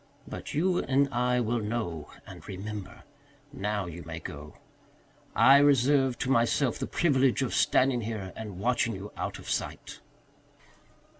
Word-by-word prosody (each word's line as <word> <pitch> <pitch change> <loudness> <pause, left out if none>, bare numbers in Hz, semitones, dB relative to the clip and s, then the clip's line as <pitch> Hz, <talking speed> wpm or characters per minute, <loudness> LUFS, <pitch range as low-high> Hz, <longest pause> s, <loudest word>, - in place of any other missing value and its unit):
But - - -7
you 180 +4 +2
and 140 +1 +2
I 125 +1 +2
will 120 0 0
know 105 -8 -3 0.2
and - - -12
remember. 105 +3 -7 0.5
Now, 105 -5 -2
you 85 0 -8
may 85 -1 -7
go. 75 -1 -9 0.8
I 135 +1 +7
reserve 135 -2 +4
to 130 - 0
myself 120 +1 +2
the - - -3
privilege 135 -5 +2
of 130 - -2
standing 130 -2 +3
here 105 -4 -5
and 105 -4 -7
watching 115 +1 0
you 100 +2 -8
out - - -4
of - - -12
sight." - - -4
120 Hz, 145 wpm, -28 LUFS, 100-135 Hz, 0.8 s, I